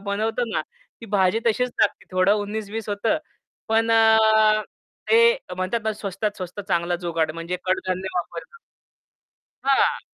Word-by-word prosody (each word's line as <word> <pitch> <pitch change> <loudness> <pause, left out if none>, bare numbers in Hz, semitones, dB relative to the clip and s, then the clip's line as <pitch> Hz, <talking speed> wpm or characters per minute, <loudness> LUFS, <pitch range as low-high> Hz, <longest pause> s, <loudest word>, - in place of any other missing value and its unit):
बनवतो 220 +4 -1
ना, - - +1 0.4
ती 230 - -9
भाजी 195 +1 +2
तशीच 250 +2 +1
टाकते 215 -2 +1
थोडं 185 +2 +3
उन्नीस 205 0 -4
बीस 220 -1 -5
होतं. 215 +9 0 0.5
पण 225 +1 +2 1.2
ते 465 +1 +6 0.2
म्हणतात 185 +5 -1
ना 220 - 0
स्वस्तात 205 0 -4
स्वस्त 185 +2 -6
चांगला 175 -1 0
जुगाड 165 -2 -1
म्हणजे 165 +2 -4
कडधान्य 185 0 -1
वापरतात. 175 - -5 1.1
हां. 275 0 +2
205 Hz, 130 wpm, -23 LUFS, 185-225 Hz, 1.2 s, ते